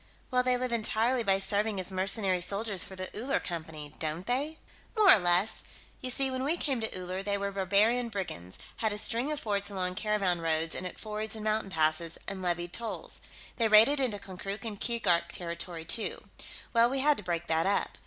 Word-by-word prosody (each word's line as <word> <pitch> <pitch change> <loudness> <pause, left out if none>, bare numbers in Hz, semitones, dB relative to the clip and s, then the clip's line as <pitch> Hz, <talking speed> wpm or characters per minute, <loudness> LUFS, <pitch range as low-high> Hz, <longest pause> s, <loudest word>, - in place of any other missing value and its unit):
"Well, 250 0 +4
they 250 0 +2
live 250 0 -2
entirely 235 +2 +1
by 195 -3 +3
serving 205 +1 0
as 185 +1 -3
mercenary 190 0 +1
soldiers 200 +1 +2
for 190 - -7
the 185 0 -5
Uller 250 +6 0
Company, 160 -4 -6
don't 160 +3 -3
they?" 285 +6 -1 0.4
"More 415 -3 +8
or - - +5
less. 180 +4 +2 0.4
You 255 - -2
see, 265 +1 +3
when 260 0 -2
we 310 +5 0
came 270 -7 -1
to 220 - -2
Uller, 185 +1 -4
they 200 0 -1
were 200 0 -2
barbarian 205 +5 +2
brigands; 170 - -6 0.2
had 220 -2 0
a - - -4
string 235 +6 +2
of 300 - -2
forts 200 -3 -1
along 185 -2 -2
caravan 195 -3 0
roads 160 0 0
and 185 - -4
at - - -9
fords 215 0 -5
and 215 - -7
mountain 215 -1 0
passes, 160 -1 +1
and 195 -1 -5
levied 175 -1 -2
tolls. 235 -1 -4 0.4
They 230 - +3
raided 220 +7 +6
into 245 -6 0
Konkrook 195 +2 -6
and 210 -3 -5
Keegark 175 -8 +1
territory, 170 -1 -5
too. 220 +6 0 0.5
Well, 235 0 +5
we 270 +1 +1
had 295 +1 +4
to - - -6
break 170 -1 -2
that 165 +1 +1
up. 200 - 0
200 Hz, 205 wpm, -30 LUFS, 180-230 Hz, 0.5 s, More